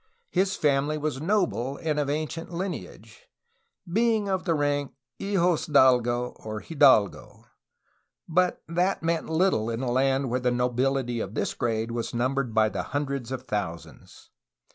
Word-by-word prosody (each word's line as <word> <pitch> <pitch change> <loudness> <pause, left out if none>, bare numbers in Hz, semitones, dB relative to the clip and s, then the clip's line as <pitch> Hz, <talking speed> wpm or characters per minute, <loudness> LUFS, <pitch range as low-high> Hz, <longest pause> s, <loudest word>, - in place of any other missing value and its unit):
His 190 +1 +1
family 145 +1 +1
was 150 -2 -3
noble 160 - 0
and 155 -2 -1
of 145 -1 -1
ancient 155 +3 -3
lineage, 140 - -6 0.6
being 220 +2 +1
of 190 -1 -1
the 165 -3 +2
rank 145 -2 0 0.3
of - - -5
hijosdalgo, 130 - +3
or 110 -1 -5
hidalgo, 135 - +2 0.8
but 180 +2 +1
that 175 +3 0
meant 165 -1 -1
little 160 - +2
in 115 +2 -3
a 125 - -1
land 135 0 +1
where 125 - +1
the 125 0 +1
nobility 125 0 0
of 100 0 -5
this - - -1
grade 115 -1 -1
was 115 0 -4
numbered 130 +1 0
by 110 0 +5
the - - -3
hundreds 140 -4 -3
of 130 - -4
thousands. 90 -6 -6
140 Hz, 145 wpm, -26 LUFS, 120-165 Hz, 0.8 s, by